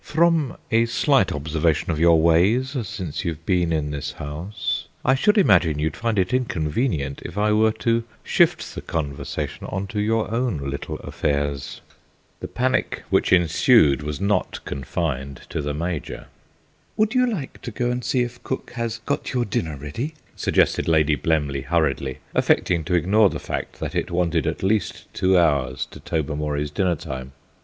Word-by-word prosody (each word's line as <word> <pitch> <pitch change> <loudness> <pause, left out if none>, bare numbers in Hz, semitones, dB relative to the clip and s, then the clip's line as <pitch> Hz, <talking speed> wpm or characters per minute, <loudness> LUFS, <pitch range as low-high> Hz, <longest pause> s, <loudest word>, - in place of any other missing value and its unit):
"From 160 -4 +2
a 115 0 +4
slight 115 - +3
observation 80 +2 0
of 80 - -2
your 85 -1 +6
ways 100 - +3
since 90 -5 -4
you've 80 -3 -4
been 90 -3 +2
in 75 -2 0
this 75 +2 -4
house 85 +5 -4 0.2
I 130 - +5
should 210 +11 +3
imagine 95 - +4
you'd 75 +1 -1
find 115 -2 -1
it 95 +2 +1
inconvenient 80 - -1
if 85 - -8
I 105 +1 +2
were 110 +1 +4
to 115 0 +3 0.2
shift - - +2
the - - -6
conversation 75 -4 -4
on 95 +1 -3
to 105 - -1
your 110 +1 0
own 115 -5 0
little 70 0 -4
affairs." 70 -1 -2 0.6
The - - -5
panic 130 +1 -1
which - - +2
ensued 85 - +5
was 75 -1 -4
not 100 -1 -1
confined 70 -1 -3
to - - -2
the 75 0 -3
Major. 85 0 -4 0.7
"Would 215 +1 +2
you 250 -1 +3
like 155 -11 -5
to - - -5
go 120 +2 -1
and 125 0 -2
see 125 +2 +1
if 120 0 -7
cook 130 - -4
has 115 -2 -3
got 145 - -2
your 125 -2 +1
dinner 80 -6 -2
ready?" 75 - -5 0.2
suggested - - +2
Lady 80 -2 +3
Blemley 75 -4 0
hurriedly, 70 -3 0 0.2
affecting 85 -3 +2
to 90 +1 +1
ignore 100 +5 +4
the - - -4
fact - - -5
that - - -4
it - - -1
wanted 85 -3 0
at - - -2
least 100 -1 0
two 95 0 +3
hours 70 -6 +2
to - - -11
Tobermory's 75 -2 -2
dinner 90 +1 +1
time. 65 -5 -7
85 Hz, 165 wpm, -23 LUFS, 75-115 Hz, 0.7 s, your